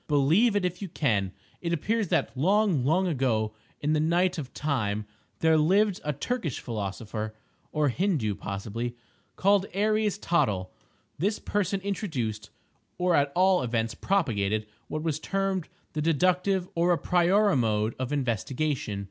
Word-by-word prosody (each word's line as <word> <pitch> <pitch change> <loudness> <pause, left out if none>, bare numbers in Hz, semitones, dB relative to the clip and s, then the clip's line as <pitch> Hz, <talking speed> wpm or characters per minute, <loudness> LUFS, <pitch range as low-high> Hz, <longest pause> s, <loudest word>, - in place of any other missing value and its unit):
Believe 160 - +4
it 200 -3 +2
if 180 +1 -3
you 195 - -4
can! 105 - 0 0.3
It 170 -1 -1
appears 215 +6 0
that - - 0
long, 185 - +2
long 170 +8 +2
ago, 125 -9 0 0.3
in 150 +1 +1
the 155 - +2
night 175 +3 +2
of 135 -4 -6
Time, 110 -8 -1 0.4
there 160 0 +5
lived 195 +5 +3
a 150 - 0
Turkish 170 - -3
philosopher 110 0 -4 0.4
(or 150 -2 +2
Hindoo 150 - 0
possibly) 110 +5 -4 0.4
called 200 0 +3
Aries 215 0 +1
Tottle. 105 - 0 0.5
This 205 +6 +1
person 195 -1 -1
introduced, 130 - -3 0.5
or 180 0 +2
at 140 -2 +3
all 185 0 +4
events 115 -2 -1
propagated 110 - 0 0.2
what 155 0 -4
was 155 -2 -1
termed 195 0 -1 0.2
the 155 - -2
deductive 180 +4 +2
or 170 +1 +2
a - - +1
priori 185 +5 +3
mode 110 -3 +1
of 130 0 -3
investigation. 130 -3 -1
155 Hz, 145 wpm, -27 LUFS, 115-190 Hz, 0.5 s, there